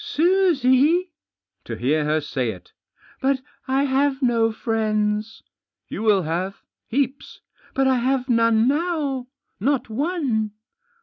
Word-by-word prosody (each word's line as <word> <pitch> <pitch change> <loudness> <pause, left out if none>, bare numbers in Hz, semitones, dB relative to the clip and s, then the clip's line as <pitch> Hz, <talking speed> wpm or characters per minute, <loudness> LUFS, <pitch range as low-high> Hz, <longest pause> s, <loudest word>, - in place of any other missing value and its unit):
"Susie?" 340 -1 +3 0.5
To - - -5
hear 150 +4 +1
her 155 +1 +1
say 130 -5 -2
it 90 -4 -9 0.5
1 275 +1 +2
"But 260 - -12 0.2
I 265 +1 +2
have 275 0 +1
no 230 -2 +3
friends." 215 -1 -1 0.5
"You - - -5
will 210 -4 +3
have; 180 +5 -3 0.2
heaps." 270 +2 -2 0.2
" - - -29
But 270 - +2
I 260 -1 +3
have 260 +1 0
none 230 -2 +3
now. 290 -4 -1 0.3
Not 260 +1 0
one." 255 - -1
250 Hz, 130 wpm, -23 LUFS, 215-280 Hz, 0.5 s, Susie